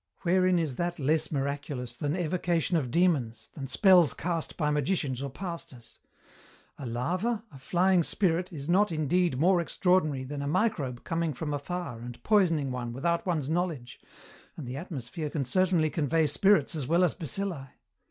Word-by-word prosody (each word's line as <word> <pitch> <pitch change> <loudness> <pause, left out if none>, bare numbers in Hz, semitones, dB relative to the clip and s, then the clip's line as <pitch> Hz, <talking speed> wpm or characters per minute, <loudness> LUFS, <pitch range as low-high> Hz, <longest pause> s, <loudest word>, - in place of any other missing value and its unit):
Wherein 185 +1 +3
is 155 -7 -1
that 175 0 -2
less 155 +2 +1
miraculous 140 -3 -3
than 145 +4 -2
evocation 175 -1 0
of 140 -7 0
demons, 150 -8 0
than 135 -3 -6
spells 180 +1 +5
cast 165 -2 -3
by 150 -3 +1
magicians 145 -3 -1
or 140 - -3
pastors? 140 -7 -8 0.8
A 135 - -5
larva, 185 - -1
a 135 - -12
flying 180 +5 +2
spirit, 180 +1 0
is 145 -4 -7
not, 190 +3 +3
indeed, 160 0 +1
more 175 +4 +4
extraordinary 170 -5 +1
than 140 +2 -5
a 140 - -3
microbe 150 - -1
coming 165 -4 -1
from 150 +2 -3
afar 145 -3 -4
and 120 0 -9
poisoning 165 -10 +2
one 120 -2 -4
without 170 +8 -1
one's 155 -6 0
knowledge, 160 -7 -3 0.6
and 145 -6 -7
the 125 - -5
atmosphere 150 -1 -5
can 145 -2 -2
certainly 170 +2 +2
convey 160 +1 +1
spirits 160 +2 +3
as 150 -6 -4
well 170 +4 +3
as 175 - +2
bacilli. 165 -2 -3
160 Hz, 160 wpm, -28 LUFS, 135-180 Hz, 0.8 s, spells